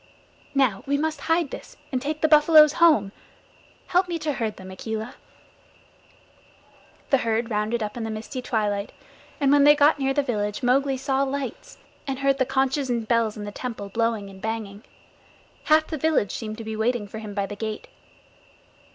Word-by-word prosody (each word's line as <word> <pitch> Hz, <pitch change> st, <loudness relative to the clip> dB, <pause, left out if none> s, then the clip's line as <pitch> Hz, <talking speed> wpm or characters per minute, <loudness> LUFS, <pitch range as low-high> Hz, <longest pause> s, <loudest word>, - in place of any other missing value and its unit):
"Now 255 Hz, -8 st, +2 dB
we 285 Hz, +1 st, +1 dB
must 310 Hz, -1 st, -2 dB
hide 325 Hz, -2 st, +1 dB
this -, -, -9 dB
and 255 Hz, -2 st, -1 dB
take 300 Hz, +2 st, -3 dB
the 315 Hz, -, +4 dB
buffaloes 305 Hz, 0 st, +7 dB
home! 295 Hz, -13 st, +5 dB, 0.8 s
Help 360 Hz, +1 st, +3 dB
me 345 Hz, -1 st, -2 dB
to 305 Hz, -2 st, -2 dB
herd 220 Hz, -5 st, -3 dB
them, 190 Hz, 0 st, -10 dB
Akela." 220 Hz, +5 st, -5 dB, 2.0 s
The 270 Hz, -, +5 dB
herd 230 Hz, 0 st, -1 dB
rounded 215 Hz, +2 st, -1 dB
up 210 Hz, -, -5 dB
in 235 Hz, -, -4 dB
the 225 Hz, -, -3 dB
misty 220 Hz, +4 st, -5 dB
twilight, 210 Hz, -4 st, -2 dB, 0.5 s
and 280 Hz, -2 st, +3 dB
when 285 Hz, 0 st, +5 dB
they 295 Hz, +1 st, +7 dB
got 295 Hz, 0 st, +4 dB
near 270 Hz, 0 st, +1 dB
the 285 Hz, -, +2 dB
village 210 Hz, -2 st, -2 dB
Mowgli 270 Hz, +2 st, +2 dB
saw 270 Hz, 0 st, 0 dB
lights, 275 Hz, -2 st, -4 dB, 0.3 s
and 270 Hz, -1 st, -2 dB
heard 275 Hz, 0 st, +1 dB
the 260 Hz, -, +2 dB
conches 265 Hz, +1 st, 0 dB
and 235 Hz, -2 st, -1 dB
bells 230 Hz, -2 st, +1 dB
in 210 Hz, -, -6 dB
the 205 Hz, -, -6 dB
temple 220 Hz, -3 st, -6 dB
blowing 225 Hz, -1 st, -1 dB
and 190 Hz, -1 st, -13 dB
banging. 220 Hz, -2 st, -4 dB, 0.8 s
Half 310 Hz, 0 st, +4 dB
the 315 Hz, -2 st, -5 dB
village 310 Hz, -9 st, +1 dB
seemed 215 Hz, -1 st, -5 dB
to 225 Hz, -, -7 dB
be 220 Hz, 0 st, -5 dB
waiting 220 Hz, -1 st, 0 dB
for 220 Hz, +2 st, -8 dB
him 210 Hz, -2 st, -8 dB
by 200 Hz, -1 st, 0 dB
the 205 Hz, -, -7 dB
gate. 220 Hz, -, -5 dB
245 Hz, 185 wpm, -24 LUFS, 215-280 Hz, 2.0 s, buffaloes